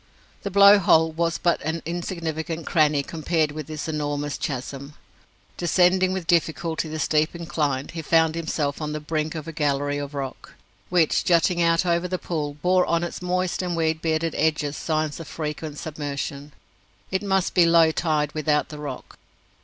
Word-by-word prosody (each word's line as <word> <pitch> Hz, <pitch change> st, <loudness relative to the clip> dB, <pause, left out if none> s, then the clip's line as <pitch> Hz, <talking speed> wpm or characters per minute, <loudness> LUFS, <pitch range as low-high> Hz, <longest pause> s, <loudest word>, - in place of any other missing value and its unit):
The 200 Hz, -, -3 dB
Blow 200 Hz, +1 st, +7 dB
hole 160 Hz, -3 st, +4 dB
was 165 Hz, +1 st, -1 dB
but 170 Hz, -1 st, +1 dB
an 160 Hz, +2 st, -3 dB
insignificant 165 Hz, -1 st, -4 dB
cranny 150 Hz, -3 st, +2 dB
compared 160 Hz, 0 st, -1 dB
with 150 Hz, -1 st, -7 dB
this 155 Hz, -1 st, -5 dB
enormous 145 Hz, -2 st, -2 dB
chasm. 140 Hz, +1 st, -5 dB, 0.6 s
Descending 180 Hz, +2 st, +3 dB
with 190 Hz, -2 st, -3 dB
difficulty 165 Hz, -1 st, 0 dB
the 155 Hz, -, -4 dB
steep 155 Hz, +2 st, +1 dB
incline, 150 Hz, -5 st, -2 dB
he 165 Hz, -, -5 dB
found 160 Hz, 0 st, +3 dB
himself 155 Hz, -3 st, -2 dB
on 150 Hz, 0 st, -3 dB
the 150 Hz, -, -3 dB
brink 155 Hz, +1 st, -2 dB
of 155 Hz, 0 st, -6 dB
a -, -, -4 dB
gallery 145 Hz, -2 st, 0 dB
of 145 Hz, 0 st, -6 dB
rock, 135 Hz, -2 st, -6 dB, 0.3 s
which, 175 Hz, -4 st, +2 dB
jutting 175 Hz, 0 st, +3 dB
out 165 Hz, +1 st, +3 dB
over 170 Hz, 0 st, +1 dB
the 185 Hz, 0 st, -2 dB
pool, 150 Hz, -5 st, -3 dB
bore 180 Hz, 0 st, +3 dB
on 170 Hz, 0 st, +1 dB
its 175 Hz, -, -5 dB
moist 180 Hz, 0 st, -1 dB
and 180 Hz, -2 st, -2 dB
weed 160 Hz, -1 st, 0 dB
bearded 160 Hz, 0 st, 0 dB
edges 150 Hz, -2 st, 0 dB
signs 155 Hz, -1 st, -2 dB
of 165 Hz, -, -8 dB
frequent 150 Hz, -1 st, -5 dB
submersion. 145 Hz, -1 st, -5 dB, 0.6 s
It 190 Hz, -, 0 dB
must 190 Hz, -2 st, 0 dB
be 175 Hz, -2 st, +5 dB
low 165 Hz, -1 st, +5 dB
tide 155 Hz, -3 st, 0 dB
without 150 Hz, -1 st, 0 dB
the 150 Hz, -, -8 dB
rock. 145 Hz, -3 st, -8 dB
160 Hz, 170 wpm, -24 LUFS, 150-170 Hz, 0.6 s, Blow